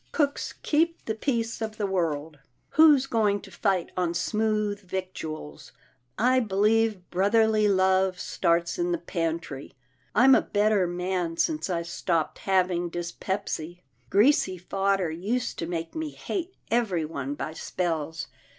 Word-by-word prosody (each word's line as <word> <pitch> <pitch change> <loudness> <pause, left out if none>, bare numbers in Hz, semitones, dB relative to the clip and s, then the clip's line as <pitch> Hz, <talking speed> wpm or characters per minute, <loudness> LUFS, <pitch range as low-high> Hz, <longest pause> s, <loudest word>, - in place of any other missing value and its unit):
Cooks 285 -3 -1
keep 330 +2 +1
the 220 - -1
peace 230 -1 -2
of 220 -1 -4
the 210 - -1
world. 160 -5 -2 0.3
Who's 300 -4 +6
going 215 -5 +1
to - - -13
fight 190 -5 0
on 175 -2 0
smooth 210 +2 0
victuals? 180 - -6 0.4
I 255 +3 +4
believe 215 -2 +1
brotherly 215 +3 +3
love 190 -1 +2
starts 170 - 0
in 350 0 +1
the - - +1
pantry. 165 - -4 0.4
I'm 260 +4 +7
a - - +6
better 205 -2 +2
man 175 -1 -2
since 310 - 0
I 170 -2 -1
stopped 170 -1 -1
having 180 -2 +1
dyspepsy. 175 0 -4 0.3
Greasy 205 - +3
fodder 195 -1 0
used 210 +10 -2
to 165 - -2
make 165 -1 -4
me 320 -1 -3
hate 365 +4 -5 0.2
everyone 165 - -1
by 155 - -5
spells. 160 -2 -3
190 Hz, 130 wpm, -27 LUFS, 170-225 Hz, 0.4 s, I'm